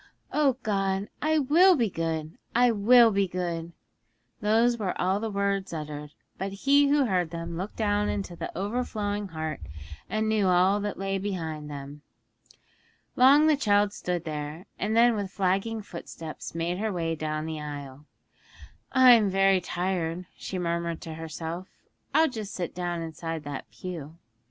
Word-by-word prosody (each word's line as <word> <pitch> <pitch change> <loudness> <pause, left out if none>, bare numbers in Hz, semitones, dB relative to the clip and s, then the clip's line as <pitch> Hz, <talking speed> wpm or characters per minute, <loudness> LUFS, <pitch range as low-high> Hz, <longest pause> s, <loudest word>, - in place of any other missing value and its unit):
'O 290 -3 +3
God, 195 -1 0
I 315 +1 +2
will 330 +7 +6
be 240 -6 +2
good! 165 -3 -3 0.2
I 245 0 +5
will 230 +2 +6
be 200 -1 +2
good!' 170 -2 -3 0.7
Those 225 +3 +3
were 190 -4 -2
all 190 +2 +1
the 225 +1 -3
words 200 -2 -1
uttered, 150 -1 -6 0.3
but 195 +1 -2
He 285 +1 +6
who 285 -1 +3
heard 180 -6 +1
them 170 0 -5
looked 185 +5 -5
down 210 -1 +1
into 195 -4 -3
the - - -5
overflowing 205 -1 -2
heart, 155 - -4 0.5
and 215 0 0
knew 215 -3 +2
all 185 +3 +4
that 205 0 -3
lay 195 0 -1
behind 160 -6 -4
them. 145 0 -8 1.1
Long 275 +4 +7
the 310 -1 +5
child 205 -6 +2
stood 175 -4 -3
there, 155 +2 -5
and 215 +2 0
then 235 0 +6
with 200 -2 -3
flagging 195 +3 0
footsteps 165 -3 -8
made 170 +2 -1
her 220 0 -1
way 165 -3 -1
down 155 -1 -3
the 160 -1 -4
aisle. 145 -1 -7 0.9
'I'm 245 -5 +7
very 195 0 +3
tired,' 180 -1 -2
she 190 - -5
murmured 170 -1 -2
to 160 - -7
herself; 165 +3 -6 0.5
'I'll 320 0 +5
just 215 -6 -6
sit 175 -3 -3
down 175 -2 -3
inside 165 -1 -5
that 140 -2 -6
pew.' 165 -4 -7
190 Hz, 155 wpm, -27 LUFS, 165-215 Hz, 1.1 s, Long